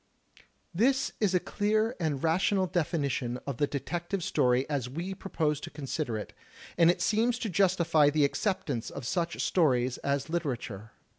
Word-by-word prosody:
This 260 +9 +2
is 200 -4 +2
a - - +5
clear 215 +5 0
and 150 -5 -1
rational 185 +4 +2
definition 145 -8 -1
of 140 -4 -4
the 145 - +2
Detective 175 +6 -3
Story 125 -2 +2
as 140 -5 -2
we 170 +8 -4
propose 155 -6 -1
to - - -7
consider 140 -4 -3
it, 105 - -7 0.4
and 170 -1 +5
it 180 +1 +2
seems 230 +4 +2
to 235 -3 -3
justify 170 -5 +3
the 145 0 +3
acceptance 140 - -1
of 140 - -7
such 170 +5 -1
stories 130 -7 +2
as 140 -1 -1
literature. 125 - -3
160 Hz, 155 wpm, -29 LUFS, 140-185 Hz, 0.4 s, a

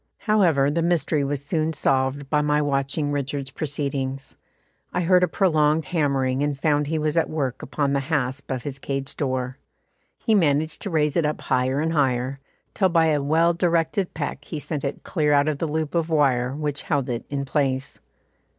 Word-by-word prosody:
However, 170 -10 +3
the 165 +3 0
mystery 165 -3 +1
was 140 0 -2
soon 160 0 0
solved 135 -1 0
by 150 +1 +2
my 150 0 +2
watching 145 +1 0
Richard's 140 -1 -3
proceedings. 135 -2 -3 0.6
I - - -1
heard 180 +1 +4
a - - +4
prolonged 155 -5 +2
hammering 135 -5 0
and 145 -1 -1
found 150 -1 +1
he 160 +2 -1
was 155 +1 0
at 165 - +2
work 135 -5 -2
upon 140 0 -1
the 140 - +2
hasp 140 -2 -2
of 130 -2 -3
his 135 -2 -5
cage 135 0 -4
door. 130 -1 -2 0.6
He 225 - 0
managed 155 -5 +2
to 200 - -3
raise 150 -4 +1
it 170 - +3
up 150 0 -1
higher 130 +2 +1
and 160 +1 0
higher, 130 -2 0 0.3
till 190 -2 +2
by 165 -2 +3
a 150 -2 +2
well 165 +4 +3
directed 170 +2 0
peck 145 -2 -4
he 155 - -6
sent 150 -1 -4
it 140 0 -4
clear 150 -4 +1
out 145 +1 +4
of 150 -2 -1
the 165 - -1
loop 155 0 -2
of 170 -1 0
wire 135 -5 +2
which 150 -1 -2
held 145 -5 -1
it 120 -1 -3
in 140 -1 -2
its 135 -1 -8
place. 135 -2 -1
145 Hz, 195 wpm, -24 LUFS, 135-160 Hz, 0.6 s, heard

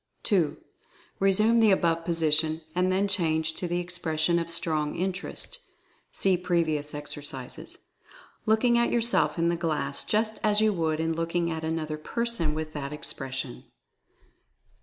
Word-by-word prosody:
2. 175 -9 +2 0.6
Resume 215 +4 +4
the 220 -1 +5
above 170 -4 +2
position, 160 -1 +1
and 180 +1 +1
then 195 +2 +2
change 160 -4 +1
to 180 - -4
the 175 +1 -1
expression 170 -1 0
of 170 0 -4
Strong 155 -3 0
Interest 190 - -4 0.5
(see 190 -1 +2
previous 165 -4 0
exer 150 0 -4
cises), 130 -3 -7 0.7
looking 235 +2 +4
at 235 - +2
yourself 225 -11 +2
in 170 0 +2
the 170 - +1
glass 155 -5 -1
just 215 0 0
as 210 -1 +3
you 215 -1 +3
would 160 -3 -1
in 165 0 0
looking 170 +1 -1
at 160 0 -4
another 160 -1 -3
person 235 -5 -1
with 155 0 -4
that 140 -1 -5
ex 150 - -2
pression. 135 -1 -5
165 Hz, 150 wpm, -27 LUFS, 155-190 Hz, 0.7 s, the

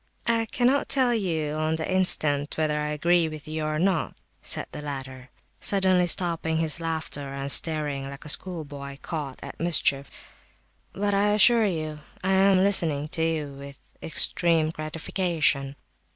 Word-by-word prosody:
"I 230 -1 0
cannot 255 +5 0
tell 255 -3 +3
you 165 -9 -2
on 155 +1 -1
the 160 0 -4
instant 155 -6 +2
whether 155 -1 0
I 150 - -3
agree 165 +2 +1
with 155 -1 -10
you 155 0 -4
or 155 0 -2
not," 180 -1 -1 0.2
said - - +2
the - - -8
latter, 135 -3 -8 0.3
suddenly 185 -2 +1
stopping 165 -2 0
his 160 0 +2
laughter, 160 -4 -4
and 140 0 -1
starting 145 -4 +2
like 140 +3 -11
a - - -7
schoolboy 145 -5 -2
caught 145 -5 -6
at - - -10
mischief. 140 -5 +1 0.8
"But, 205 +1 -2
I 205 +1 +2
assure 225 +2 +6
you, 155 -4 -4 0.2
I 190 - 0
am 190 0 +3
listening 160 -7 +1
to 160 - -1
you 160 -3 -1
with 140 0 -11 0.2
extreme 165 -1 +3
gratification." 155 -3 -2
160 Hz, 150 wpm, -25 LUFS, 145-185 Hz, 0.8 s, assure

